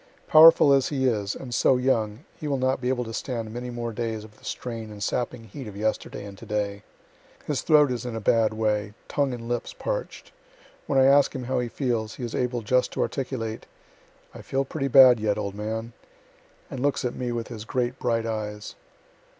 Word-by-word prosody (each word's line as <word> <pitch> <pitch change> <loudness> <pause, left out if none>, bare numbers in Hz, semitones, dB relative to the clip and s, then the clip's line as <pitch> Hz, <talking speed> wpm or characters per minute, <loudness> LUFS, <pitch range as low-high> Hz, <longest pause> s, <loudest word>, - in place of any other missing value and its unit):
Powerful 155 -2 +8
as 135 -1 +3
he 135 -3 -1
is, 105 -5 0
and 125 -2 -7
so 130 +2 +4
young, 120 0 0
he 155 - -6
will 140 -2 0
not 130 0 0
be 125 - -1
able 125 -1 0
to 115 -1 -7
stand 115 -3 -4
many 125 +1 -5
more 120 -1 -4
days 110 -1 -3
of 105 -1 -15
the - - -25
strain 115 -3 -5
and 105 -1 -7
sapping 125 0 -2
heat 115 +4 -9
of 100 -1 -9
yesterday 110 -1 -2
and 100 -1 -9
to - - -10
day. 105 -1 -2 0.6
His 145 -3 -1
throat 150 -4 +5
is 125 0 -3
in 120 -2 -5
a - - -2
bad 110 +1 +3
way, 105 -1 -1
tongue 140 -2 0
and 120 -2 -6
lips 120 0 -3
parch'd. - - -5 0.6
When 140 - +1
I 130 - +6
ask 140 +1 +5
him 130 - -4
how 130 +1 -1
he 125 - -1
feels, 115 -4 -2
he 125 - -7
is 120 - -4
able 125 -2 -1
just 125 +4 +2
to - - -1
articulate, 125 -5 -4 0.7
"I - - -10
feel 135 0 -1
pretty 135 0 -3
bad 130 -3 +8
yet, 105 -1 0
old 100 -2 -3
man," 110 +3 -4 0.8
and 130 - -5
looks 140 0 0
at 125 - -1
me 125 -1 -3
with 115 -1 -4
his 110 -3 -7
great 125 +2 -2
bright 115 -2 0
eyes. 105 -2 -4
120 Hz, 210 wpm, -25 LUFS, 110-130 Hz, 0.8 s, Powerful